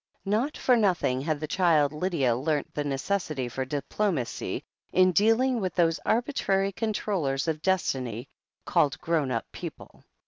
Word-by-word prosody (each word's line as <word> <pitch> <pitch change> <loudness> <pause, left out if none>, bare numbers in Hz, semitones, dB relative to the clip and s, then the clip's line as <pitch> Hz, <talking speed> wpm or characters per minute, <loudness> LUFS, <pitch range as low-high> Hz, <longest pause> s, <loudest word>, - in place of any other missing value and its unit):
Not 225 +9 0
for 250 - +3
nothing 180 - +1
Jiad 155 -2 0
the 155 - -4
child 155 -4 +3
Lydia 150 -7 +1
learnt 145 +3 -1
the 150 - -2
necessity 145 -1 -2
for 130 +2 -3
diplomacy 145 - -2 0.3
in 185 0 +5
dealing 225 +6 +3
with 185 -2 -2
those 165 -2 +2
arbitrary 210 -5 +1
controllers 185 -9 -1
of 155 -1 -1
Destiny 130 - -1 0.4
called 145 - +2
grown 160 -5 0
up 115 -2 -1
people. - - -9
165 Hz, 140 wpm, -27 LUFS, 140-200 Hz, 0.4 s, in